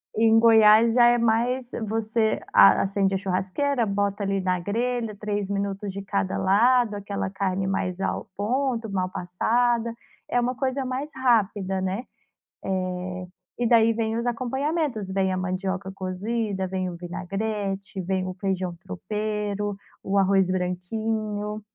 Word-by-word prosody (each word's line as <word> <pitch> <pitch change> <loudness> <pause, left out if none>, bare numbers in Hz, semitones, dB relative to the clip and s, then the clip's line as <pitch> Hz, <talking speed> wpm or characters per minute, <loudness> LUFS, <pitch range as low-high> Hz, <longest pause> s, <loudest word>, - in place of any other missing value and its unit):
Em 225 0 +5
Goiás 225 0 +6
já 240 0 +6
é 240 0 +5
mais 235 +2 +1 0.2
você 220 +1 0
a - - +7
acende 195 0 +1
a - - +2
churrasqueira, 195 +8 0
bota 200 0 -1
ali 195 0 0
na 185 -1 0
grelha, 230 +3 -2
3 205 -1 -3
minutos 200 0 -2
de 200 - -5
cada 200 -1 -1
lado, 230 +3 +3
aquela 200 -1 -3
carne 195 -1 -1
mais 185 -1 -2
ao - - -2
ponto, 235 +2 -1
mal 185 -2 -1
passada. 230 +7 0 0.4
É 245 - +2
uma 245 +1 0
coisa 265 +1 -1
mais 260 +3 -3
rápida, 205 -6 +1
né. 190 +5 -2 0.6
Eh, 185 -1 -3 0.3
e 240 - +1
daí 230 -1 +5
vêm 225 0 -1
os 235 - -2
acompanhamentos: 255 - -1
vem 190 -1 +1
a - - -1
mandioca 190 +1 -3
cozida, 195 +1 -2
vem 185 0 -2
o 175 - -7
vinagrete, 195 +3 -4
vem 185 +1 -1
o 185 - -4
feijão 185 -2 -2
tropeiro, 210 +1 -3 0.3
o 195 +1 0
arroz 195 -1 +3
branquinho. 210 +3 -2
205 Hz, 145 wpm, -25 LUFS, 190-230 Hz, 0.6 s, a